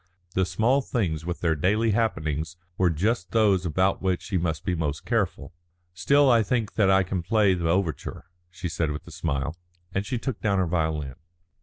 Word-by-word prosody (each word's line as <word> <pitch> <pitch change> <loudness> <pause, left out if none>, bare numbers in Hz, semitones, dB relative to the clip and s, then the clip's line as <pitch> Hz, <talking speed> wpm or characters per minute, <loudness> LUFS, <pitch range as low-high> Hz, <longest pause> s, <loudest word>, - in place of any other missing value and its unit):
The 95 -1 +1
small 115 +10 +2
things 85 - -2
with 90 - -3
their 80 -2 +2
daily 105 +8 +1
happenings 80 -7 -1 0.2
were 90 -1 +3
just 90 +3 -1
those 100 -5 +3
about 95 +4 +1
which 95 -2 0
she 100 - -4
must 80 -2 -2
be 90 - 0
most 75 -3 -2
careful. 100 -6 -1 0.4
"Still 140 +12 +3
I 120 -3 +5
think 110 0 -1
that 100 -3 +3
I 95 0 +5
can 95 0 -2
play 105 +2 +3
the 85 -2 -1
overture," 85 -5 -1 0.2
she 90 +1 -5
said 80 -1 -1
with 75 0 -5
a - - -12
smile, 70 +3 -2 0.4
and 95 - 0
she 115 +5 -3
took 120 -1 -4
down 100 -3 +1
her 95 - +2
violin. 80 -5 -1
90 Hz, 190 wpm, -26 LUFS, 80-110 Hz, 0.4 s, I